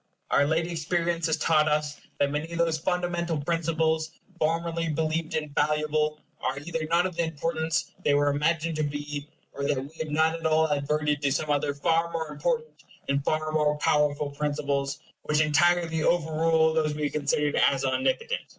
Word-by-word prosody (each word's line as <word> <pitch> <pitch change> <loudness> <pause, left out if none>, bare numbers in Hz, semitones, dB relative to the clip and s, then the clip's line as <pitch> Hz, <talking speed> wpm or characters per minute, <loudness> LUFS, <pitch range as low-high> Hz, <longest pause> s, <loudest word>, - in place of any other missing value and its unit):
Our 140 0 +4
late 160 +2 +1
experience 170 0 -1
has 160 - +1
taught 155 -1 +3
us 150 -1 -1 0.2
that 140 0 +1
many 150 +3 -3
of 170 - -4
those 165 -2 +1
fundamental 175 -1 -1
principles, 160 0 0 0.3
formerly 165 +1 0
believed 155 +1 -1
infallible, 150 0 0 0.2
are - - -1
either 160 +2 -4
not 170 +2 +3
of 185 -2 -3
the 170 - +1
importance 160 -1 -2
they 145 - +3
were 145 0 +3
imagined 160 +2 0
to 155 - 0
be, 145 0 -4 0.3
or 140 - -5
that 140 - +1
we 135 +3 -7
have 160 -1 -3
not 160 +2 +2
at 165 -1 -2
all 160 0 +3
adverted 150 0 0
to 140 -2 +1
some 150 +2 0
other 145 0 0
far 165 +3 +1
more 160 -2 -3
important 155 0 -2 0.3
and 140 0 +1
far 155 +1 0
more 150 -1 +2
powerful 150 -1 +1
principles, 140 -1 -1 0.2
which 150 0 0
entirely 160 +2 +3
overrule 160 -1 +2
those 155 -2 +1
we 150 - -3
had 145 - -1
considered 150 0 0
as 135 -1 -2
omnipotent. 260 - 0
155 Hz, 175 wpm, -27 LUFS, 145-165 Hz, 0.3 s, Our